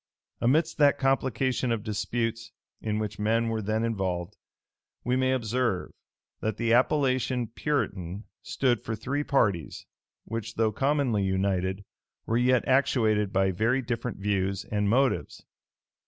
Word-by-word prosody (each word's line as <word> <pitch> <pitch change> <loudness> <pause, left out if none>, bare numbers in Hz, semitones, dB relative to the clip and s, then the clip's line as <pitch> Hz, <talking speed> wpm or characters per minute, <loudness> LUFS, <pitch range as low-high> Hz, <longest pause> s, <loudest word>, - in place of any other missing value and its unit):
Amidst 155 +7 +2
that 145 -1 +5
complication 130 -2 +1
of 115 -3 -1
disputes 115 +1 -2 0.3
in 105 -1 -1
which 105 -1 -4
men 115 +2 +1
were 110 -1 -1
then 110 +2 -1
involved, 95 -6 -2 0.7
we 125 - +1
may 130 0 +2
observe, 120 -5 -1 0.5
that 110 -1 -2
the 115 -1 +1
appellation 130 -1 +2
"Puritan" 105 - -3 0.2
stood 125 -3 0
for 110 - -3
three 140 +7 -2
parties, 100 - 0 0.4
which, 115 -1 -5
though 110 -1 +2
commonly 135 -2 +1
united, 95 0 0 0.4
were 115 - -1
yet 125 0 +3
actuated 110 -6 +2
by 95 0 +2
very 115 +8 +1
different 120 -1 -3
views 100 -1 -1
and 105 -1 +1
motives. 130 +4 +1
115 Hz, 130 wpm, -27 LUFS, 105-130 Hz, 0.7 s, that